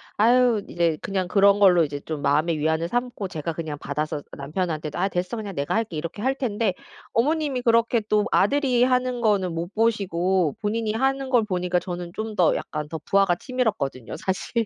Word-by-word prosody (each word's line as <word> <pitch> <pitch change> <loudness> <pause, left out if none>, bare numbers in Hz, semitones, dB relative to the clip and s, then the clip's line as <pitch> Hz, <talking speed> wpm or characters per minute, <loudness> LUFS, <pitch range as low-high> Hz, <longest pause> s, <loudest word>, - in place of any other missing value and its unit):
아유 235 -1 +4
이제 170 -3 +1
그냥 190 -2 -2
그런 200 +1 +4
걸로 180 -4 +6
이제 145 -1 -3
좀 155 -3 -4
마음의 155 +3 +2
위안을 160 +2 0
삼고 245 -3 -2
제가 165 -1 -4
그냥 155 -3 -5
받아서 150 +1 -3 0.2
남편한테도 155 +1 -3
"아 190 +2 +1
됐어. 180 +6 -2
그냥 205 -3 -5
내가 140 +7 -1
할게." 220 -8 -1
이렇게 170 +6 -5
할 265 +2 +1
텐데 220 -6 -1 0.4
어머님이 285 +1 +1
그렇게 230 0 +3
또 210 -1 +2
아들이 255 +1 +3
하는 250 -1 +1
거는 195 -6 +1
못 170 +4 -4
보시고 190 -6 +1
본인이 215 +1 -1
하는 270 +2 0
걸 245 -4 +4
보니까 180 -3 0
저는 175 -1 -6
좀 215 -1 -4
더 175 - +4
약간 150 -1 -4
더 160 0 -5
부아가 195 -3 +3
치밀었거든요 205 - -2
사실. 215 +4 -2
195 Hz, 385 characters per minute, -24 LUFS, 165-230 Hz, 0.4 s, 걸로